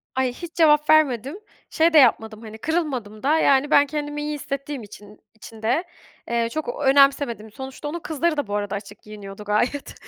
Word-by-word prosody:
Ay, 260 -1 0
hiç 340 +5 -9
cevap 300 -3 +4
vermedim. 290 - +2 0.3
Şey 325 +1 +2
de - - +6
yapmadım 225 -5 +3
hani 220 -1 -10
kırılmadım 260 -8 -3
da 300 +3 +3
yani 280 +1 +3
ben 285 - +6
kendimi 295 0 -4
iyi 300 0 -3
hissettiğim 275 -2 -5
için 205 0 -14 0.2
için 220 0 -13
de, 245 +10 +1 0.5
eee, 235 -1 0
çok 310 0 -4
ö - - 0
önemsemedim. 270 -5 +3
Sonuçta 265 +4 -8
onun 330 +4 -4
kızları 315 0 -1
da 290 - -2
bu 205 - -3
arada 205 -1 -2
açık 200 0 -9
giyiniyordu 210 -1 -10
gayet. 215 +7 -1
265 Hz, 185 wpm, -23 LUFS, 220-300 Hz, 0.5 s, de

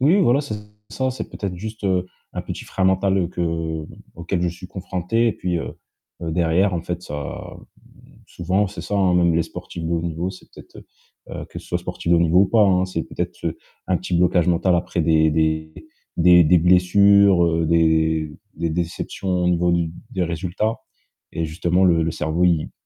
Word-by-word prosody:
Oui, 160 +10 +4
voilà, 140 -5 +3
c'est 140 -7 -5 0.4
ça, 130 -1 -1
c'est 125 - -6
peut-être 100 -3 -5
juste, 110 +3 -7
heu, 90 -2 +1 0.3
un - - -4
petit - - -7
frein 95 - -4
mental 95 -1 +2
que 80 -2 -3 0.3
auquel 85 +2 -3
je 90 - +1
suis 90 +2 -8
confronté 95 +5 -1
et - - 0
puis, 90 -2 -2
heu, - - -6 0.4
derrière 85 +3 +1
en 85 - -2
fait 85 0 -4
ça, 75 -4 -7 0.4
mmh, - - -20 0.2
souvent, 95 +4 -1
c'est 100 - -8
ça, - - -5
hein, 95 -2 +3
même 85 -1 +3
les 85 - +1
sportifs 85 - -8
de 80 - -3
haut 85 -1 0
niveau, 85 +2 -3
c'est 95 - -14
peut-être - - -15 0.5
heu, - - -6
que - - -8
ce - - -16
soit - - -1
sportifs 85 - -5
de 85 - +6
haut - - +3
niveau 85 +2 +4
ou 100 - +4
pas, 110 +2 +4
hein, 90 -1 +3
c'est 85 -3 -3
peut-être, - - -6
heu, - - -2 0.3
un 95 - +2
petit 90 0 -4
blocage 90 0 +3
mental 90 +1 +2
après 85 0 -1
des 80 -1 +3
des 80 0 0 0.4
des 90 +1 +6
des 85 +3 +5
blessures, 90 +2 +5
heu, 85 0 +1
des 80 -1 +2 0.2
des 85 -1 -2
déceptions 85 +3 -4 0.2
au - - +3
niveau 90 0 +2
d 85 -1 0 0.2
des 95 - -2
résultats 90 +6 -2 0.6
et 80 - -2
justement 85 +4 +1
le 85 -3 +4
le 80 - -1
cerveau 80 +3 -1
il 85 -4 +1
90 Hz, 200 wpm, -21 LUFS, 85-95 Hz, 0.6 s, de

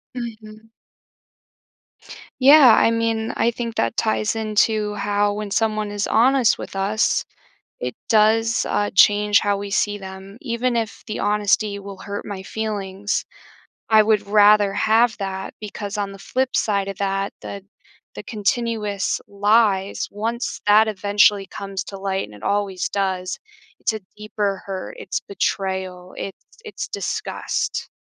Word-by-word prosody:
Mhm. 225 -2 -8 1.7
Yeah, 270 -3 +8
I 230 - +4
mean 225 -1 0
I 235 - +3
think 235 -1 -5
that 115 - 0
ties 110 - 0
into 215 -1 +1
how 205 0 0
when 210 -1 -5
someone 215 -1 0
is 205 0 -2
honest 255 +1 +4
with - - -8
us, 200 +3 +1 0.6
it 125 -1 -4
does, 225 +1 +3
uh, 205 - 0
change 205 +1 +5
how 205 -1 +1
we 200 0 -6
see 205 +1 0
them. 190 +2 -10
Even 240 -1 -1
if 225 -2 -3
the 215 - -4
honesty 205 0 +1
will 200 -1 -9
hurt 205 0 -6
my 200 -2 -6
feelings, 205 -1 -3 0.7
I 220 -1 +7
would 215 -1 +1
rather 205 -1 +5
have 220 +3 +3
that, 190 -1 -4
because 205 0 -6
on 200 -1 -2
the 195 - -11
flip 255 +7 -1
side 200 -2 0
of 195 - -5
that, 195 0 -1
the 200 -1 -7 0.5
the - - -7
continuous 210 -2 -1
lies 205 -1 +2
once 230 +4 -3
that 215 +2 +6
eventually 205 -1 +3
comes 195 -1 -5
to 195 +1 -8
light 195 0 -2
and 105 - -14
it 105 - -14
always 200 - -1
does, 185 -2 -2 0.4
it's - - 0
a 220 - -5 0.2
deeper 210 -2 -3
hurt, 190 -1 -6
it's - - -3
betrayal, 190 -2 -3
it's 195 - -7 0.2
it's 440 - -6
disgust. - - -3
205 Hz, 145 wpm, -22 LUFS, 195-220 Hz, 1.7 s, Yeah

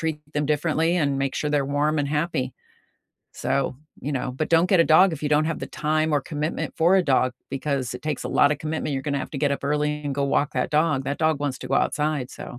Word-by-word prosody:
treat 160 -2 -2 0.2
them 145 -1 0
differently 160 +2 +1
and 140 -2 +1
make 135 - -1
sure 150 - -1
they’re 140 -2 +1
warm 150 +1 +2
and 140 - -2
happy. 160 -6 -1 1.0
So, - - +1 0.5
you - - -1
know, 125 - -3
but 155 - -1
don’t 165 +2 +5
get 185 - +5
a - - +7
dog 190 +3 +7
if 155 - -6
you 150 - 0
don’t 155 +1 +3
have - - -5
the - - -9
time 155 0 +2
or 145 - +2
commitment 150 +2 -2
for 170 +3 +4
a 185 - +4
dog 130 - +3 0.3
because 140 -2 -1
it 125 - -10
takes 150 - -2
a - - -3
lotta 145 +1 +5
commitment, 155 -1 -2
you’re 135 - -2
gonna 140 -1 0
have - - -17
to 140 - -2
get 140 - +2
up - - -29
early 150 0 +1 0.2
and 140 - -1
go - - +2
walk 145 - +2
that 125 - -1
dog, 155 -3 +2
that 140 +2 -3
dog 160 -1 +3
wants 140 -3 -2
to 130 - -7
go 135 - +2
outside, 150 -4 -1
so - - -6
150 Hz, 255 wpm, -24 LUFS, 140-155 Hz, 1.0 s, a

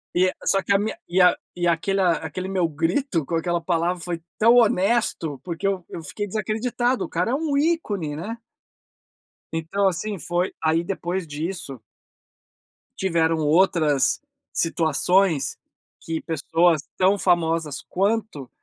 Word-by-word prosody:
e 185 +1 +4
é 185 - -1
só 195 - +2
que 195 - -3
a 195 - +4
minha 215 +2 -2
e 180 +2 +2
a 180 - +6 0.2
e 175 0 0
aquela 180 +2 +2
aquele 170 +4 -5
meu 185 -3 +1
grito 165 - -1
com 165 - -2
aquela 175 +1 0
palavra 170 +1 0
foi 170 -1 -4 0.2
tão 230 +2 +6
honesto, 200 - +2
porque 170 0 -5
eu 190 -3 -1
eu 170 - -7
fiquei 205 +7 -4
desacreditado, 230 +5 -1
o - - -10
cara - - 0
é - - 0
um 295 -1 0
ícone, 215 - 0
né. 210 +9 -5 1.2
Então, 180 +5 0
assim, 195 +3 -2
foi 175 +2 -1
aí 160 +1 +2
depois 180 -1 -3
disso 150 -2 -5 1.2
tiveram 165 -3 +1
outras 155 -2 +3 0.3
situações 165 0 +1 0.4
que 165 -1 -3
pessoas 165 0 +2 0.2
tão 190 +2 +4
famosas 165 -5 +1
quanto, 200 - -1
175 Hz, 140 wpm, -23 LUFS, 165-200 Hz, 1.2 s, a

